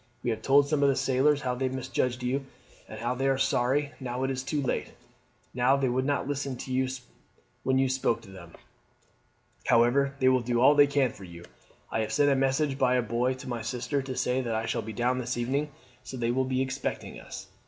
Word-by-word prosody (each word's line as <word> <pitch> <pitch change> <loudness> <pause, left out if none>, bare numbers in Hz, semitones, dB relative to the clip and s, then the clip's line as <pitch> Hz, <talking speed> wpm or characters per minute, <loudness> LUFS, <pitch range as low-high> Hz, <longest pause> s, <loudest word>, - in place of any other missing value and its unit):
We 120 - 0
have 110 -1 -3
told 140 +3 +4
some 145 -1 0
of 140 - +5
the 135 - +2
sailors 135 +2 +2
how 125 -2 -1
they 130 +1 -1
misjudged 130 -1 -2
you, 135 +2 -1 0.4
and 120 +4 -3
they 135 - +1
are 135 -1 +2
sorry, 135 +2 +1
now 125 -1 -3
it 135 - 0
is 130 -1 -2
too 145 +3 -2
late, 135 - -2 0.6
that 130 +3 +3
they 135 -2 +1
would 130 +2 0
not 140 -2 0
listen 140 -2 -3 1.0
when 130 0 +1
you 135 0 +3
spoke 130 -3 0
to 95 - -13
them. 85 -3 -12 1.1
However, 135 +4 +3
they 130 -2 +2
will 130 0 +5
do 120 0 0
all 135 +4 +7
they 145 -1 +6
can 140 -3 +1
for 100 - -13
you. 85 -1 -11 0.5
I - - 0
have 110 0 -2
sent 145 +5 +3
a - - +3
message 135 +1 +1
by 125 -1 +3
a 125 - +2
boy 120 +3 0
to 130 +1 -10
my 120 -2 -3
sister 125 +4 -2
to 130 -1 -5
say 125 +1 0
that 115 -3 -2
I 110 +1 -1
shall - - -1
be 110 - -7
down 125 +3 0
this 125 0 -3
evening, 135 +5 -1 0.3
so 130 - -8
they 120 -1 0
will 130 +2 +1
be 130 0 0
expecting 130 - -4
us. - - -9
130 Hz, 220 wpm, -28 LUFS, 120-135 Hz, 1.1 s, all